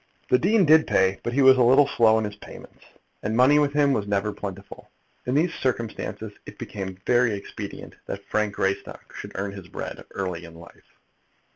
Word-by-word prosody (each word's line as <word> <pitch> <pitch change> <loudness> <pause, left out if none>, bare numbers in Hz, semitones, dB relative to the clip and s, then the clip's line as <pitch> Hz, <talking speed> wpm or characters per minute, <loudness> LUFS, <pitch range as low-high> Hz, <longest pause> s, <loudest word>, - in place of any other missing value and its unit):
The 125 - +5
dean 200 +2 +3
did 155 +1 +5
pay; 95 0 +2
but 120 - -4
he 140 +2 +3
was 130 0 +7
a - - +6
little 135 +4 +5
slow 110 -5 +4
in 110 - 0
his 105 -1 -6
payments, 105 - -14 0.4
and 110 +2 -2
money 140 +4 +5
with 145 -1 +2
him 145 -2 +3
was 105 -5 -2
never 100 +1 0
very - - -13
plentiful. 100 -1 -8 0.4
In 125 - 0
these 165 +4 +2
circumstances 115 -4 -3 0.2
it - - -10
became 95 -2 -6
very 120 -3 +3
expedient 100 - -8
that 100 0 -6
Frank 105 -1 -1
Greystock 95 0 -3
should - - -8
earn 100 +1 -3
his 100 -3 -10
bread - - -7
early 90 -3 -3
in 85 -1 -13
life. 85 0 -17
110 Hz, 195 wpm, -24 LUFS, 100-135 Hz, 0.4 s, was